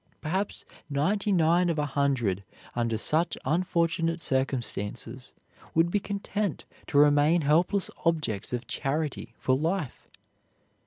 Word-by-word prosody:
Perhaps 190 +6 -3 0.2
ninety 195 +9 +1
nine 175 0 +3
of 165 - 0
a 150 - +1
hundred 130 -9 0 0.3
under 115 -2 0
such 160 +8 +1
unfortunate 165 +1 +1
circumstances 130 -3 -2 0.4
would 165 +1 +3
be 205 - +2
content 200 -2 -3 0.2
to - - 0
remain 145 +3 +5
helpless 170 +7 +2
objects 150 - 0
of 125 0 -3
charity 150 +1 -3
for 130 - +1
life. 160 0 -2
155 Hz, 115 wpm, -28 LUFS, 135-175 Hz, 0.4 s, remain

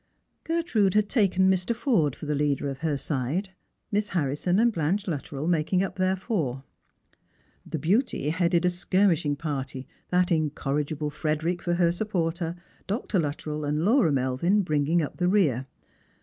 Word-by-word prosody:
Gertrude 285 - +1
had 210 -1 +3
taken 190 -5 +3
Mr. 190 +4 +1
Forde 220 - +1
for - - -9
the 150 - -1
leader 145 -1 0
of 135 -1 -5
her 155 -3 -1
side, 145 +8 -2 0.4
Miss 210 0 0
Harrison 165 +2 0
and 235 +1 +3
Blanche 175 +5 0
Luttrell 145 -2 -4
making 175 +2 +2
up 195 0 -5
their 185 0 +2
four. 160 - -2 1.0
The - - -3
Beauty 175 - +1
headed 170 +1 +2
a 180 - +3
skirmish 180 -1 +2
ing 145 0 +1
party, 135 -3 -4 0.2
that 180 0 +2
incorrigible 150 -1 -1
Frederick 160 +4 -1
for 175 -1 0
her 170 -1 +3
supporter, 170 -3 -2 0.3
Df 210 +5 -2
Xiuttrell 150 -3 -2
and 150 +3 0
Laura 225 - +4
Melviu 140 +10 +1
bringing 155 +2 +1
up 145 - -6
the 180 - +1
rear. 150 - +2
170 Hz, 155 wpm, -26 LUFS, 150-190 Hz, 1.0 s, Laura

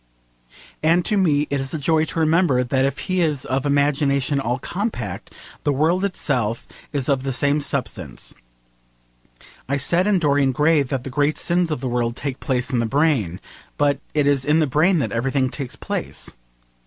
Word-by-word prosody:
And 165 +3 +3
to 210 - +2
me 150 -7 +2
it 140 -1 0
is 135 +3 -3
a - - -1
joy 155 +2 +2
to 165 - -4
remember 160 -5 +3
that 130 +2 +1
if 140 +1 -1
he 185 -1 0
is 150 -5 0
'of 135 +2 -1
imagination 140 -1 +1
all 120 -1 -1
compact,' 175 - -4 0.3
the 145 - +2
world 160 +7 +1
itself 125 - -1 0.2
is 140 -3 -1
of 135 -2 +2
the 135 0 -2
same 145 +3 +1
substance. 110 - -4 1.4
I 140 - +1
said 170 +7 +1
in 205 -2 +3
Dorian 140 -5 +2
Gray 150 +3 +3
that 135 -2 -3
the 135 - -6
great 145 +3 +1
sins 175 0 +1
of 150 -5 -3
the 130 - -2
world 120 -1 -1
take 135 -1 -4
place 130 -1 -1
in 125 - +1
the 115 - 0
brain: 135 - +1 0.4
but 145 -1 +2 0.2
it 150 -2 +3
is 140 -2 +2
in 150 +3 +3
the 160 - +3
brain 160 +7 +3
that 115 -9 -1
everything 130 +3 0
takes 135 -4 -5
place. - - -5
140 Hz, 185 wpm, -22 LUFS, 130-155 Hz, 1.4 s, And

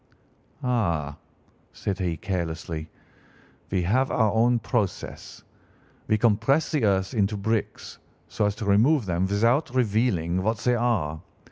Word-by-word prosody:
"'Ah!' 85 - 0 0.6
said 95 -1 -3
he 85 -3 -1
carelessly, 80 -3 -4 0.8
'we 95 -2 0
have 130 +9 +2
our 110 -4 +2
own 120 +2 +3
process. 110 -3 -3 0.6
We 110 - +3
compress 115 +7 +2
the 145 -8 +1
earth 95 +2 +1
into 105 -2 0
bricks, 110 +2 -3 0.3
so 105 - 0
as 100 - -2
to 110 - -5
remove 115 +7 +3
them 90 0 0
without 115 +10 +2
revealing 105 -7 +1
what 110 +4 0
they 125 +4 +1
are. 105 -11 0
105 Hz, 130 wpm, -25 LUFS, 90-120 Hz, 0.8 s, own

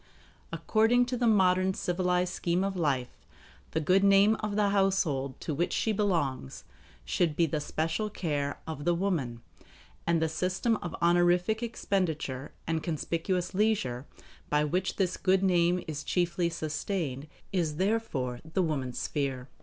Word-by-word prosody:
According 230 +3 +3
to 250 +1 -3
the 240 -1 +1
modern 190 -3 +3
civilized 180 0 0
scheme 175 +2 0
of 195 0 -2
life, 135 -8 -2 0.4
the 160 - -1
good 185 +5 +3
name 200 +2 +6
of 210 -1 -3
the 205 -1 +3
household 185 -10 +1
to 155 - -3
which 170 +5 0
she 220 - +1
belongs 170 - -1 0.4
should 165 -4 0
be 170 - +3
the 155 -1 -2
special 160 +8 -2
care 145 -8 -2
of 155 -3 -6
the 175 +2 +2
woman; 150 -11 -2 0.6
and 170 -1 +3
the 160 - +1
system 185 +8 0
of 175 -4 -6
honorific 175 +5 +3
expenditure 160 - -2
and 160 0 -1
conspicuous 170 +2 -2
leisure 185 - 0 0.4
by 150 0 +2
which 180 +5 -1
this 185 -2 0
good 190 0 +2
name 180 -1 +3
is 150 -2 -4
chiefly 175 +1 0
sustained 155 -3 -3 0.3
is 165 -5 0
therefore 160 - -1
the 160 +4 -1
woman's 135 -6 -2
sphere. 135 -3 -2
175 Hz, 145 wpm, -29 LUFS, 150-195 Hz, 0.6 s, name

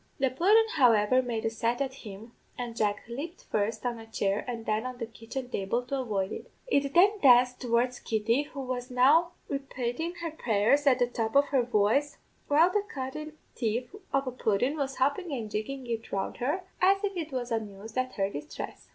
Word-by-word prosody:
"The 265 -2 +1
pudden, 405 - +5
however, 240 -1 +5
made 235 -3 -3
a 225 - +1
set 230 +2 -1
at 270 -1 -1
him, 220 -2 -10 0.3
and 240 -2 -5
Jack 205 -2 0
lepped 290 +9 -6
first 215 +3 -2
on 240 -2 -2
a 225 - -11
chair 200 -2 -1
and 230 -2 -5
then 215 +1 0
on 255 -1 -5
the 235 - -3
kitchen 230 +4 -7
table 235 +1 -1
to 270 +2 -3
avoid 205 -6 -1
it. - - -7
It 280 - 0
then 400 +4 +5
danced 250 -4 +5
towards 245 0 +1
Kitty, 225 +4 +1
who 275 - -5
was 250 -1 -4
now 295 +8 +4
repatin' 275 +4 -3
her 335 -1 -3
prayers 265 0 +2
at 260 -2 +6
the 245 - +3
top 230 -1 -3
of 285 0 +5
her 270 -3 +3
voice, 245 +5 +1 0.3
while 320 +5 +5
the 415 - +2
cunnin' 305 +3 -6 0.2
thief 240 - -2 0.2
of 275 0 +1
a 255 - -2
pudden 245 +3 0
was 275 -3 -2
hoppin' 285 +6 0
and 230 -6 -4
jiggin' 255 +6 -4
it 230 -2 -4
round 195 -1 -2
her, 295 +10 -1 0.2
as 390 +2 +4
if 400 -1 -1
it 320 -3 -4
was 250 -2 -3
amused 215 -1 -4
at 255 0 -1
her 195 -2 +1
distress. 150 -7 -7
250 Hz, 200 wpm, -29 LUFS, 225-280 Hz, 0.3 s, at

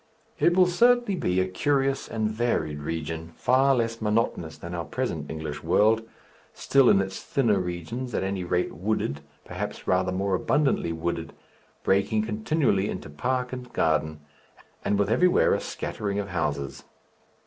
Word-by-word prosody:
It 175 +1 +3
will 185 - +7
certainly 240 +4 +3
be 95 - 0
a 95 - +1
curious 135 +7 0
and 110 -1 -1
varied 110 -10 -1
region, 80 +2 -4
far 135 +2 +4
less 115 -1 -1
monotonous 105 -7 0
than 85 +1 -8
our 85 -1 -2
present 75 - -3
English 80 -2 -5
world, 110 +2 +3 0.5
still 135 -2 +4
in 100 - +5
its 95 -1 -3
thinner 115 -8 +1
regions, 90 +8 -4
at - - 0
any 95 -1 -2
rate, 90 0 -1
wooded, 80 -5 -2 0.2
perhaps 105 +3 -5
rather 90 0 +2
more 95 +1 -1
abundantly 135 - +1
wooded, 80 0 -3 0.5
breaking 100 +3 +2
continually 110 -2 +1
into 75 - -6
park 125 - -2
and 125 -1 -7
garden, 80 -1 0 0.6
and 100 - +1
with 100 +1 +1
everywhere 180 +10 +4
a - - +1
scattering 100 -1 -4
of 100 -1 -3
houses. 75 -6 -2
100 Hz, 150 wpm, -26 LUFS, 85-125 Hz, 0.6 s, will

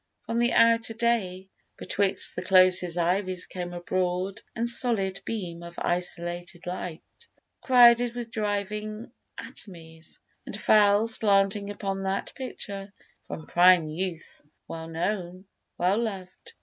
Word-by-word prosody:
From 230 - -2
the 240 0 +2
outer 230 -1 +3
day, 195 -5 -1 0.3
Betwixt 200 -1 0
the - - -3
closest 185 -2 +4
ivies 185 +1 0
came 180 -1 -6
a 175 0 -7
broad 185 +3 -2
And 235 0 -1
solid 225 -6 +2
beam 180 -7 -5
of 170 0 -11
isolated 175 0 -3
light, 180 -2 -5 0.6
Crowded 240 -1 +5
with 235 -2 -6
driving 210 +1 -3 0.3
atomies, 165 -4 -9 0.3
and - - -7
fell 205 0 +4
Slanting 200 -2 +2
upon 195 -1 -4
that 195 +1 -3
picture, 200 -6 -7 0.4
from 160 - -7
prime 175 -2 +5
youth 165 0 -5 0.3
Well 165 0 -7
known, 180 +2 -4 0.3
well 185 +5 +1
loved. 215 - -6
195 Hz, 125 wpm, -26 LUFS, 180-215 Hz, 0.6 s, Crowded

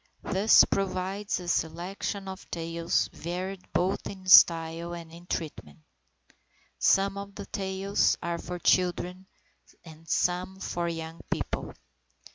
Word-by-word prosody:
This 200 +4 +6
provides 195 +2 -2
a 180 - -8
selection 185 +4 -2
of 190 0 -8
tales 165 0 -1
varied 180 +3 -5
both 185 +3 0
in 190 -1 -9
style 165 -1 +6
and 165 -1 -9
in 170 +1 -13
treatment. 145 - -5 1.0
Some 195 0 +3
of 200 0 -9
the 200 - -7
tales 195 0 0
are 170 0 -3
for 180 - -5
children, 180 +1 +1 0.6
and 160 0 -14
some 180 +1 0
for 175 -2 -2
young 165 0 -5
people. - - -3
180 Hz, 120 wpm, -28 LUFS, 170-195 Hz, 1.0 s, This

